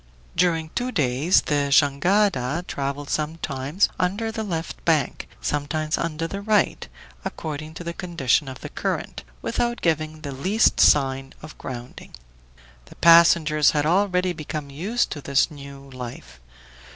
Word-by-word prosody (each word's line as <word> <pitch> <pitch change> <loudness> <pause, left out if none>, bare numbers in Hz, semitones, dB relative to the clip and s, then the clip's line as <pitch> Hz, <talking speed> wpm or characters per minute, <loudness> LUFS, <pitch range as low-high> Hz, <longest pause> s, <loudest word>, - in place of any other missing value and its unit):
During 165 -3 +1
two 250 +1 -2
days 145 - +2
the 145 -1 0
jangada 155 +1 +2
traveled 140 +1 -4
sometimes 150 +1 -1
under 205 +5 0
the 220 0 -4
left 170 -6 -4
bank, 155 -5 0
sometimes 155 +1 -1
under 165 -1 -2
the 195 +4 -5
right, 210 -1 +1 0.4
according 155 0 -6
to 175 - -7
the 170 0 -4
condition 165 -7 0
of 130 -1 -8
the - - -7
current, - - -3 0.2
without 240 0 -1
giving 155 -1 -1
the 145 -3 -5
least 190 - +2
sign 135 -1 +3
of 155 - -10
grounding. 125 -1 -8 0.7
The - - -15
passengers 165 -3 +6
had 145 - +1
already 180 +1 +2
become 155 -2 -6
used 200 +12 -1
to 145 - -5
this 140 +1 +2
new 140 -1 -11
life. 120 - -9
155 Hz, 140 wpm, -23 LUFS, 140-175 Hz, 0.7 s, passengers